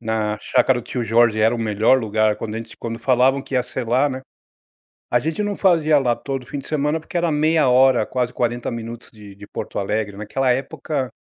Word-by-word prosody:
na 110 -2 -2
chácara 125 +2 +2
do - - -15
tio 125 - -3
Jorge 115 0 +3
era 110 +2 +3
o - - -4
melhor 110 +3 +3
lugar 110 -2 +1
quando 110 -1 -5
a - - -3
gente 115 0 -8
s - - -14
quando 115 0 -5
falavam 130 +1 +3
que 135 - -7
ia 125 - +3
ser 125 -1 -5
lá, 130 +5 +3
né. 130 -1 -5 0.9
A 120 - +4
gente 160 - -2
não 205 -1 -2
fazia 160 -6 +3
lá 125 -3 +1
todo 135 0 -5
o - - -16
fim 145 - -5
de - - -9
semana 150 +1 0
porque 165 +3 -8
era 170 -1 +1
meia 155 -1 +2
hora 130 -2 +5
quase 125 0 -2
40 120 0 -2
minutos 115 0 -7
de 105 -3 -13
de 100 +1 -13
Porto - - -6
Alegre, 100 0 -2
naquela 125 +5 -1
época 135 +1 -3
125 Hz, 230 wpm, -21 LUFS, 110-135 Hz, 0.9 s, hora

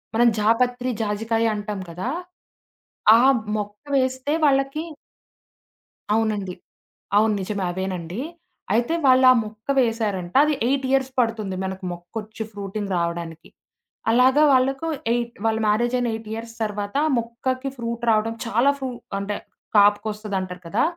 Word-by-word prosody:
మనం 240 +1 +5
జాపత్రి, 245 +3 +2
జాజికాయ 225 +2 0
అంటాం 205 -1 -4
కదా! 180 +9 -4 1.1
ఆ - - +4 0.4
మొక్క 205 0 -5 0.2
వేస్తే 260 +3 0
వాళ్ళకి 275 +2 +2 1.3
అవునండి. 210 -4 0 0.6
అవును. 215 0 +4
నిజమే. 200 0 -3
అవేనండి. 185 0 -4 0.5
అయితే 240 +7 +1
వాళ్ళు 260 0 +6
ఆ - - +7
మొక్క 215 0 -12
వేశారంట. 215 -7 0
అది 305 - +1
8 270 +1 +1
ఇయర్స్ 265 -1 +2
పడుతుంది, 220 -5 0
మనకు 190 0 -5
మొక్కొచ్చి 215 +6 -7
ఫ్రూటింగ్ 200 0 -5
రావడానికి. 170 -1 -4 0.6
అలాగా 260 +5 +5
వాళ్ళకు 270 +4 +2 0.2
ఎయిట్ 235 0 -1
వాళ్ళ 225 0 +2
మ్యారేజ్ 235 +4 +2
అయిన 245 - 0
8 220 0 -6
ఇయర్స్ 230 0 -6
తర్వాత 205 +3 -3 0.2
మొక్కకి 255 +3 -2
ఫ్రూట్ 235 0 -4
రావడం 220 +1 +1
చాలా 235 +4 +3
ఫ్రూ 265 -1 -3 0.3
అంటే, 205 +1 -3 0.4
కాపుకొస్తదంటారు 205 -3 +1
కదా! 205 +8 +1
220 Hz, 125 wpm, -23 LUFS, 205-245 Hz, 1.3 s, ఆ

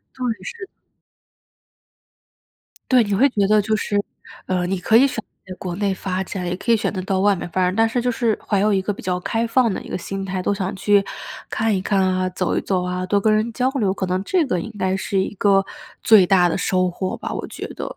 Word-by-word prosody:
对， 255 - -6 0.2
是。 465 -5 -7 2.3
对， 250 -2 +6
你 205 -1 -2
会 255 +8 +5
觉 205 -6 +1
得 215 0 +4
就 215 +2 0
是， 205 -1 0 0.4
呃， 180 -1 0
你 190 +2 -1
可 220 +5 +2
以 260 +4 +7
选 270 - -2
择 215 -3 -10
在 185 - -5
国 180 -2 -4
内 200 -1 0
发 190 0 -3
展， 180 -1 -5
也 175 - -1
可 235 +5 -1
以 230 - +5
选 215 - -1
择 185 - -3
到 190 0 -1
外 200 0 +3
面 175 - -5
发 185 - -1
展， 180 +1 0
但 225 +1 +4
是 240 +2 -1
就 245 - 0
是 230 -2 0
怀 200 -2 +2
有 210 +1 +2
一 190 - +2
个 205 +2 -2
比 - - -10
较 180 -1 -1
开 225 +5 -1
放 230 -1 +2
的 - - -4
一 - - -11
个 - - -2
心 195 +2 -5
态。 190 -1 -3
都 200 - 0
想 195 0 -3
去 200 +1 +3 0.5
看 220 -1 0
一 185 - -1
看 195 0 +1
啊， 185 0 +1
走 185 -1 -2
一 - - 0
走 185 -2 -1
啊， 180 0 -3
多 200 +2 +2
跟 215 +1 +2
人 220 +2 0
交 250 +3 0
流， 210 -9 0
可 190 - -3
能 185 +1 -1
这 345 - +1
个 180 -9 -1
应 220 - -7
该 190 0 +1
是 190 +1 -1
一 190 - -3
个 195 -1 +3 0.4
最 215 -4 +6
大 180 -1 +4
的 170 - -1
收 185 0 +1
获 185 +1 -4
吧， - - -6
我 - - -4
觉 - - -7
得。 - - -5
195 Hz, 270 characters per minute, -21 LUFS, 185-220 Hz, 2.3 s, 以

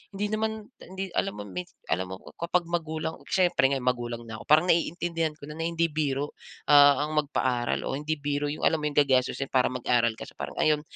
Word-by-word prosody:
hindi 205 +2 -1
naman 220 0 -2
ta - - -13
hindi 190 0 -5
alam - - 0
mo 105 - -5
mins 90 -2 -7
alam 90 +3 0
mo - - -4
ko - - -13
kapag 175 +1 +1
magulang 160 -1 -2
syempre 175 -7 +3
ngayon 135 -2 -1
magulang 120 -2 -1
na 110 -1 -7
ako. - - -10
Parang 155 +3 +6
naiintindihan 165 -1 0
ko 145 - -10
na - - -6
na 165 - 0
hindi 170 0 +1
biro, 145 -1 -1 0.4
ah, 145 -1 +7
ang 155 - -5
magpaaral 130 -4 0
o - - -2
hindi 150 +2 -2
biro 145 0 -1
yung 150 - -5
alam 160 - +3
mo 150 - 0
yung 145 - -10
gagastosin 135 -1 +1
para 130 -1 +3
mag-aral 120 -2 +1
kasi - - -9
parang - - -6
ayun. 150 -1 +3
145 Hz, 220 wpm, -27 LUFS, 130-165 Hz, 0.4 s, ah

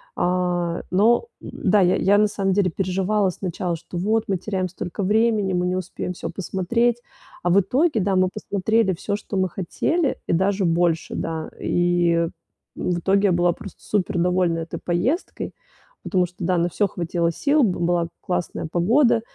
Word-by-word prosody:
а, 175 -1 0
но, 220 - +4 0.2
да, 200 +1 +1
я, 180 0 +4
я, 200 +1 +3
на 210 - +4
самом 195 -2 -1
деле 195 -1 +2
переживала, 195 +3 0
сначала, 180 -1 -3
что 170 +2 -8
"вот 215 +5 +1
мы 195 - 0
теряем 185 0 -2
столько 180 +2 -5
времени, 210 -1 +2
мы 180 0 +1
не 180 0 0
успеем 180 0 -4
всё - - -6
посмотреть". 230 +6 0 0.4
А 175 - +1
в 185 +3 +5
итоге, 260 - +1
да, 195 0 +1
мы 185 0 +3
посмотрели 210 0 0
всё, 200 +4 -3
что 205 -1 -5
мы 185 -1 +1
хотели 280 - -1
и - - +1
даже 190 +3 +1
больше, 170 -1 +1
да. 160 -1 -3
И 175 -1 +2 0.5
в 175 -1 -1
итоге 195 +3 +2
я - - +2
была 175 0 +2
просто 200 - -11
супер 185 -4 -1
довольна 180 -1 +1
этой 165 0 -5
поездкой, 210 - -1 0.5
потому 180 -2 +1
что, 180 - -22
да, 185 -1 +2
на 170 +1 +1
всё 205 +4 +1
хватило 170 -2 -1
сил, 285 - +2
б 195 -6 +1
была 170 0 +1
классная 175 -2 -3
погода, 230 +8 +3
185 Hz, 175 wpm, -23 LUFS, 175-205 Hz, 0.5 s, в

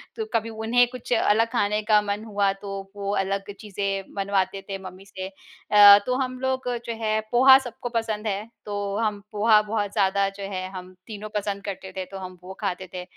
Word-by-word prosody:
तो 440 - -3
कभी 225 0 0
उन्हें 225 +2 +2
कुछ 250 -1 -4
अलग 225 0 +3
खाने 210 -3 +1
का 210 0 +4
मन 205 +1 -3
हुआ 200 -2 +1
तो 195 -1 -5 0.2
वो 200 0 -3
अलग 195 +1 -2
चीज़ें 200 -2 -4
बनवाते 195 -1 0
थे 195 - -3
मम्मी 185 +1 -15
से। 190 -1 -7 0.4
अ, 205 -1 +10
तो 250 - 0
हम 255 0 -3
लोग 260 -1 -1 0.2
जो 230 - -3
है 215 0 +1
पोहा 265 +2 +8
सबको 245 -1 -7
पसंद 225 -2 -2
है 205 +1 -2 0.2
तो 205 -1 -3
हम 210 -2 -1
पोहा 215 0 +5
बहुत 210 -1 -2
ज़्यादा 195 0 +2
जो 200 - -6
है 185 0 -3
हम 185 -1 -9
तीनों 215 -1 -7
पसंद 200 -1 -2
करते 190 -1 -6
थे, 185 0 -5
तो 195 +1 -9
हम 185 -1 -8
वो 190 - -8
खाते 185 -2 -3
थे। 180 - -5
205 Hz, 200 wpm, -25 LUFS, 195-220 Hz, 0.4 s, अ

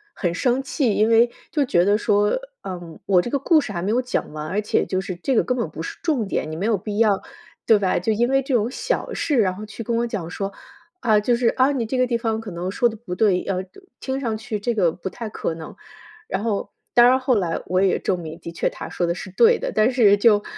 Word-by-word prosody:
很 175 -3 -1
生 255 +6 +1
气， 265 -5 0
因 215 - +3
为 230 +1 +5 0.2
就 300 -3 +2
觉 175 -9 +2
得 205 +1 +4
说： 210 - +2 0.3
“嗯， 175 -3 -7
我 185 -3 +4
这 240 - -5
个 280 - +1
故 310 +3 +3
事 215 - -6
还 170 -3 -3
没 200 - 0
有 245 +3 +2
讲 250 -10 -3
完， 155 0 -5
而 200 +6 -1
且 210 - +1
就 185 - -1
是 190 -1 -4
这 260 +9 -1
个 - - +4
根 250 - -1
本 230 -10 -2
不 160 +1 -7
是 - - -7
重 285 - 0
点， 155 - -2
你 - - -4
没 185 +6 -3
有 225 - +3
必 205 +1 -5
要， 210 -3 +3 0.5
对 220 - +6
吧？ 190 -3 +1
就 200 +6 0
因 235 +3 +2
为 270 0 +3
这 270 -1 -1
种 225 0 +1
小 - - -2
事， 310 -5 0
然 185 -4 +2
后 210 - -8
去 215 +2 -8
跟 230 +2 -1
我 235 +1 0
讲 205 -8 -4
说： 195 +2 -4 0.5
‘啊， 215 -4 +4
就 240 +3 +2
是， 235 0 +1
啊， 265 +2 +2
你 250 -5 -1
这 255 +4 -2
个 255 - +3
地 240 -1 0
方 225 -1 -2
可 225 - -8
能 180 +2 -4
说 240 +3 +2
得 225 - -9
不 210 -5 -7
对， 185 -1 +2
要 185 -1 -2 0.4
听 265 0 -3
上 230 -5 -2
去 220 -2 -4
这 235 +4 -1
个 185 -7 +2
不 180 - -7
太 225 +4 -7
可 170 - -3
能。’ 160 0 -9 0.5
“然 195 +3 -2
后， 215 -3 -2 0.2
当 240 0 +8
然 260 +1 +4
后 255 -1 +2
来 175 -6 -1
我 185 +1 +1
也 195 - +2
证 185 - -1
明， 160 0 -8
的 170 - -8
确 165 - -1
他 - - -8
说 175 - -1
的 170 - +1
是 190 - -7
对 230 +4 +4
的。 - - -3
但 215 +3 +3
是 215 -5 +5
就 205 -1 +4
215 Hz, 290 characters per minute, -22 LUFS, 185-240 Hz, 0.5 s, 当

